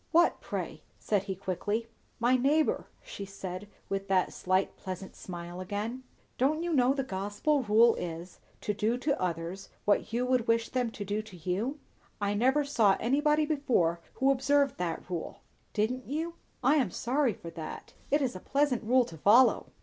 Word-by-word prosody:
"What, 340 +1 +4
pray?" - - -4 0.2
said 205 -3 0
he 190 -2 -3
quickly. 200 +4 -2 0.3
"My 240 +2 +4
neighbour," 290 +5 +2 0.2
she 200 - -7
said 195 0 -6 0.2
with 195 0 -3
that 190 -2 +2
slight, 185 +1 0
pleasant 190 0 -7
smile 175 0 -7
again. 210 +7 -3 0.4
"Don't 305 +6 +2
you 345 -1 -1
know 260 -1 +4
the 270 - 0
gospel 205 +7 0
rule 230 +1 +5
is, 170 +1 -6 0.2
to 210 - -1
do 220 +4 0
to 280 +2 -1
others 175 +2 -3 0.2
what 205 - +2
you 240 +2 0
would 250 -2 +1
wish 230 0 +2
them 250 -2 0
to 210 -2 -6
do 205 +2 -1
to 215 -4 -13
you?" 195 - -2 0.4
"I 205 -1 0
never 260 +7 +3
saw 220 -8 +3
anybody 300 +5 +2
before 250 - +1 0.2
who 270 +1 +3
observed 275 +1 +2
that 170 -2 -3
rule." 175 -3 -5 0.3
"Didn't 245 +4 -1
you? 320 +5 -2 0.3
I 280 +5 +5
am 255 -9 +2
sorry 250 +4 0
for 170 - -9
that. 160 -2 -8 0.2
It 290 0 +3
is 250 -7 -1
a - - -5
pleasant 275 +1 +1
rule 250 +3 +4
to 160 -7 -11
follow." 230 - +5
225 Hz, 175 wpm, -30 LUFS, 190-265 Hz, 0.4 s, rule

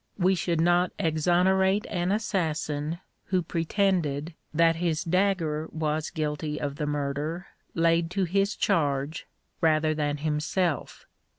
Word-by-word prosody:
We 185 0 +3
should 170 -2 0
not 175 +2 +3
exonerate 185 +5 +2
an 175 +1 -1
assassin 160 -6 -1 0.3
who 185 -2 0
pretended 165 -3 0 0.2
that 165 +1 +3
his 165 -2 0
dagger 170 -4 0
was 155 -1 -1
guilty 150 -1 -3
of 145 -1 -3
the 150 - -2
murder 145 +4 -2 0.3
laid 165 0 +2
to 190 +2 0
his 195 +3 +1
charge 145 -5 0 0.3
rather 155 -1 +3
than 150 -1 -1
himself. 155 +2 -1
165 Hz, 120 wpm, -27 LUFS, 150-180 Hz, 0.3 s, We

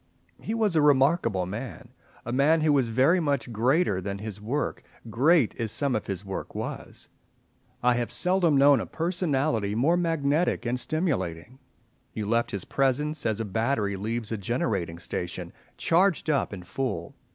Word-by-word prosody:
He 220 - -3
was 215 -6 +1
a 155 - +4
remarkable 135 - +3
man, 120 +5 -7 0.4
a 120 - -4
man 150 +5 +3
who 155 -1 +3
was 135 -4 +2
very 130 +10 +3
much 140 -6 -1
greater 120 - +2
than 100 +1 -4
his 105 0 -7
work, 135 +8 -2 0.3
great 140 +2 +3
as 115 -3 -2
some 135 +2 0
of 110 - -3
his 95 0 -4
work 95 -1 -6
was. - - -6 0.8
I 125 0 +4
have 120 -1 -2
seldom 180 -5 +2
known 140 0 +6
a - - -4
personality 150 - -1
more 150 +10 +3
magnetic 165 -4 0
and 125 +1 -1
stimulating. 125 - -2 0.6
You 105 - -3
left 115 +3 +1
his 100 -3 -4
presence, 145 +2 0
as 110 -1 -1
a 115 - -2
battery 110 0 0
leaves 110 +3 -3
a 110 - -1
generating 100 -5 -2
station, 85 +1 -5 0.2
charged 170 -2 +2
up 140 - 0
and 90 -3 -8
full. 105 -6 -3
125 Hz, 165 wpm, -26 LUFS, 105-150 Hz, 0.8 s, known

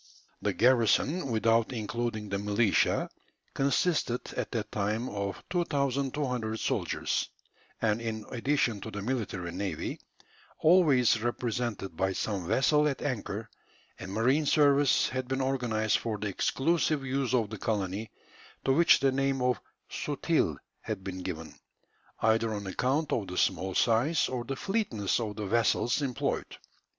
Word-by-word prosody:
The - - 0
garrison, 130 +6 +3
without 115 0 +2
including 115 -2 -3
the 100 0 -1
militia, 105 +1 +2 0.5
consisted 135 -2 0
at - - -3
that 115 -4 -3
time 105 +4 -1
of 100 -1 -4
2200 140 -7 -1
soldiers; - - -1 0.5
and, 110 +1 +1
in 110 -2 -4
addition 120 -4 0
to - - -6
the 100 0 -5
military 105 -8 -3
navy, 95 +2 -4 0.6
always 145 -10 +4
represented 120 -5 -2
by 95 +3 0
some 95 -3 -2
vessel 150 - +3
at 140 - -2
anchor, 110 -5 -3 0.5
a 95 - -7
marine 125 +10 +1
service 145 -2 +4
had 130 0 -3
been 135 +1 -1
organized 120 -5 +1
for 110 -2 -3
the 105 0 -3
exclusive 150 - +1
use 130 -1 0
of 110 -4 0
the 110 - -6
colony, 105 0 -2 0.6
to 135 - +4
which 170 +4 +5
the 135 -1 +3
name 135 0 0
of 125 0 +1 0.3
"sutil" - - 0 0.2
had 105 -4 -5
been 95 -1 -5
given, 80 -3 -6 0.7
either 110 0 +3
on 100 -1 -5
account 130 +10 0
of 105 -4 -1
the 90 - -6
small 95 0 +1
size, 125 +8 +3
or 125 -2 -3
the 135 - -3
fleetness 135 - -1
of 105 -3 -3
the 105 0 -4
vessels 115 +5 +2
employed. 130 -4 -2
115 Hz, 140 wpm, -29 LUFS, 105-135 Hz, 0.7 s, which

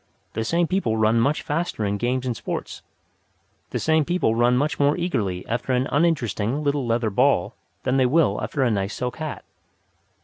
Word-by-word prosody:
The 110 - -2
same 170 +9 +1
people 165 -11 0
run 110 +1 +3
much 140 +6 +1
faster 150 -8 -2
in 100 0 -1
games 125 +3 -1
and 125 -2 -1
sports. - - -5 0.9
The - - -2
same 160 -1 +2
people 175 -7 +1
run 120 +2 +3
much 145 +3 0
more 145 +2 +3
eagerly 105 - -2
after 120 +3 -1
an 125 +2 +1
uninteresting; 140 - 0
little 140 -3 0
leather 115 -1 0
ball 125 -4 +2 0.3
than 130 +1 +1
they 130 -1 +4
will 130 -7 +2
after 115 +6 -1
a 120 - +2
nice 100 -1 -1
silk 125 -1 -3
hat. 155 -2 -5
125 Hz, 180 wpm, -23 LUFS, 110-150 Hz, 0.9 s, they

